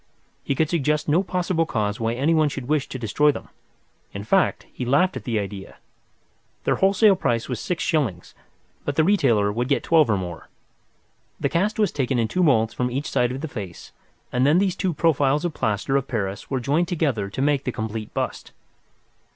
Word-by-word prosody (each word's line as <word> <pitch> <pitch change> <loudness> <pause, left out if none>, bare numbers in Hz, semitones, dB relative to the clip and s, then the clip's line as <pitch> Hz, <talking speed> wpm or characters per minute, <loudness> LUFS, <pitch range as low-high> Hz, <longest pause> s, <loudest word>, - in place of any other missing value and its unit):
He 140 - -1
could 160 +3 +2
suggest 150 -2 0
no 160 +5 +3
possible 180 -3 -1
cause 105 -5 -1
why 115 0 0
anyone 155 +3 +2
should 135 -3 -6
wish 150 -1 0
to - - -5
destroy 130 +6 +2
them—in 100 -6 -12
fact, 190 - +1
he - - -5
laughed 145 +9 +2
at - - -6
the 115 -3 -1
idea. 100 -1 -5 0.9
Their - - +1
wholesale 195 +1 +4
price 115 -8 -1
was 125 -4 -3
six 180 - -2
shillings, 120 - -1 0.5
but 145 - -3
the 160 - +4
retailer 125 - +3
would 120 +4 -2
get 140 - +1
twelve 160 -6 +4
or 105 - +2
more. 90 -3 -7 0.9
The 140 - 0
cast 190 +8 0
was 210 -2 +2
taken 130 -2 -1
in 115 -2 +1
two 185 - -1
moulds 115 -9 +3
from 125 0 -1
each 135 +4 -3
side 125 0 +1
of 130 +2 -5
the 160 - -3
face, 100 - -8 0.4
and 125 +1 +1
then 145 +5 +4
these 190 -1 +1
two 185 -4 -1
profiles 145 -1 +2
of 170 - -2
plaster 110 +4 -1
of 135 -1 +1
Paris 100 -5 -3
were 135 - -1
joined 150 +8 +1
together 140 - -1
to 100 - -7
make 140 0 +2
the 125 - -2
complete 110 -1 -5
bust. - - -4
135 Hz, 195 wpm, -23 LUFS, 115-160 Hz, 0.9 s, wholesale